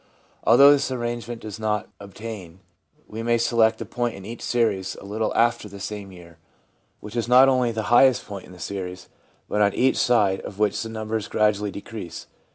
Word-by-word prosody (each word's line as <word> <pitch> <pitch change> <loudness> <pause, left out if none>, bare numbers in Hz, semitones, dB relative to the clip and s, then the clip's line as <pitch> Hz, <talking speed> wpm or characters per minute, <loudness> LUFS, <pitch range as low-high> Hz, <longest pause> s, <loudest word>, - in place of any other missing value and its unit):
Although 140 +5 +8
this 140 -2 +2
arrangement 120 -2 -4
does 110 0 -7
not 105 -1 -1
obtain, 100 -3 -9 0.5
we 110 +1 -6
may 120 0 +2
select 115 -1 +2
a - - -4
point 120 +2 -2
in 95 - -10
each 115 +3 -8
series 105 -6 0
a - - -12
little 110 +2 -2
after 120 -2 +1
the 100 0 -10
'same 100 0 -6
year/ 85 -2 -15 0.6
which 105 +2 -10
is 115 -1 -1
not 125 +2 +7
only 130 -3 +2
the 110 -1 -3
highest 130 0 +5
point 100 -2 -8
in - - -15
the 90 - -13
series, 90 0 -6 0.4
but 105 - 0
on 100 -1 +3
each 130 +1 +2
side 105 -6 +3
of 100 - -9
which 105 0 +1
the 115 - -5
numbers 110 -1 -4
gradually 105 -1 +1
de 100 - -7
crease. 105 -7 -8
110 Hz, 195 wpm, -24 LUFS, 100-120 Hz, 0.6 s, Although